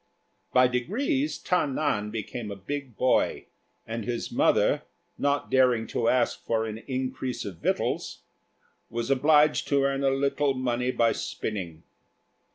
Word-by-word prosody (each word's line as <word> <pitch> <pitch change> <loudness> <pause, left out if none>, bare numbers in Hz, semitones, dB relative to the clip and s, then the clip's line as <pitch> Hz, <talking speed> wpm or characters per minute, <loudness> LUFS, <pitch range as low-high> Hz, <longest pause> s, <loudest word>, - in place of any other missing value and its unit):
By 125 0 +5
degrees 265 - -1
Ta 180 -5 +1
nan 130 -7 -1
became 110 +1 -5
a 100 - -5
big 130 +4 -6
boy; 130 - +2 0.4
and 115 0 -4
his 120 +1 -3
mother, - - +3 0.4
not 140 0 0
daring 125 -4 +4
to 115 - +2
ask 125 - +1
for 115 -1 0
an 110 0 -5
increase 130 -1 -3
of 95 -4 -6
victuals, - - -2 0.7
was 120 +3 -2
obliged 150 +2 +4
to 140 -1 +2
earn 135 0 0
a 135 - +4
little 140 +1 +1
money 125 -1 -1
by 115 -2 +3
spinning. 85 -7 -4
130 Hz, 140 wpm, -27 LUFS, 115-140 Hz, 0.7 s, By